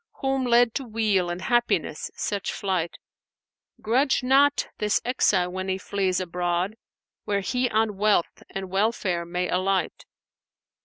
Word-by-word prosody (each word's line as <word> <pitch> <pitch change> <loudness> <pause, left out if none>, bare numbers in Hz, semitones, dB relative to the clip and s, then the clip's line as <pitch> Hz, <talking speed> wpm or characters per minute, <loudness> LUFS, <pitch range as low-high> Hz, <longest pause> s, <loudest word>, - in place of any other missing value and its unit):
* - - -67
Whom 270 -1 0
led 240 -1 +4
to 275 - -2
weal 215 -6 0
and 175 +1 -4
happiness 240 -1 0
such 200 -1 -2
flight, 185 -4 -2 0.9
Grudge 260 +4 +2
not 280 +3 +4
this 210 -1 +2
exile 190 -8 +2
when 185 +1 -4
he 190 0 0
flees 190 -1 -1
abroad 180 +2 -1 0.2
* - - -67
Where 200 -1 0
he 250 +5 0
on 215 -2 0
wealth 210 -4 +1
and 190 -1 -6
welfare 195 -4 0
may 180 +1 -2
alight. 185 -1 -1
200 Hz, 145 wpm, -25 LUFS, 185-240 Hz, 0.9 s, led